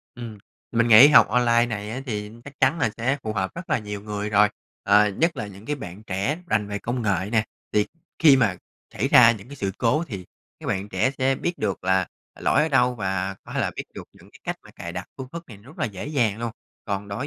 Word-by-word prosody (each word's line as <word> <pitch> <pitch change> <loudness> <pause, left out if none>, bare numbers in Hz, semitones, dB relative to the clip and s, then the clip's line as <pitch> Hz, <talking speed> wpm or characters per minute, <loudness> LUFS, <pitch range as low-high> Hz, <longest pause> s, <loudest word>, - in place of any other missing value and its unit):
Ừm, 115 -3 -8 0.3
mình 115 0 +2
nghĩ 115 +5 +10
học 150 - +7
online 120 0 +3
này 105 -2 -4
á, 125 +4 -4
thì 105 -3 -4
chắc 145 0 -13
chắn 135 +6 +3
là 115 - +1
sẽ 130 +5 0
phù 110 - -3
hợp 95 -3 -1
rất 170 +1 -8
là - - +3
nhiều 105 -2 -6
người 105 0 -4
rồi, 105 0 +5 0.3
ờ, 105 +1 +5
nhất 165 - 0
là 105 - -4
những 100 +1 -12
cái 145 +1 -1
bạn 100 -5 -9
trẻ 100 - -1
rành 105 -10 +1
về 105 0 -3
công 120 +3 -3
nghệ 100 -3 0
nè. 110 -1 +3 0.3
Thì 105 -1 +2 0.3
khi 150 -4 +7
mà 110 -8 +2 0.4
xảy 125 +8 -1
ra 125 -4 +8
những 105 0 -10
cái 145 - -10
sự 100 -6 -2
cố 145 +7 +2
thì 100 - -7 0.4
các - - -8
bạn 95 +2 -2
trẻ 130 - +1
sẽ 135 0 +2
biết 175 +6 -3
được 100 -4 -2
là 95 -1 +2 0.3
lỗi - - +3
ở 155 - +1
đâu 125 -3 +3
và 95 -3 -2
có - - -10
thể - - -1
là - - 0
biết - - -4
được - - -8
những - - -19
cái - - -18
cách - - -3
mà - - -15
cài 85 - -8
đặt 90 0 -6
phương 130 -1 -7
thức 170 0 -7
này 110 - -10
rất 130 - -16
là - - 0
dễ 105 -2 -5
dàng 120 -9 0
luôn. 115 0 -3 0.3
Còn 100 -1 -3
đối 105 +8 -4
110 Hz, 255 wpm, -24 LUFS, 100-130 Hz, 0.4 s, nghĩ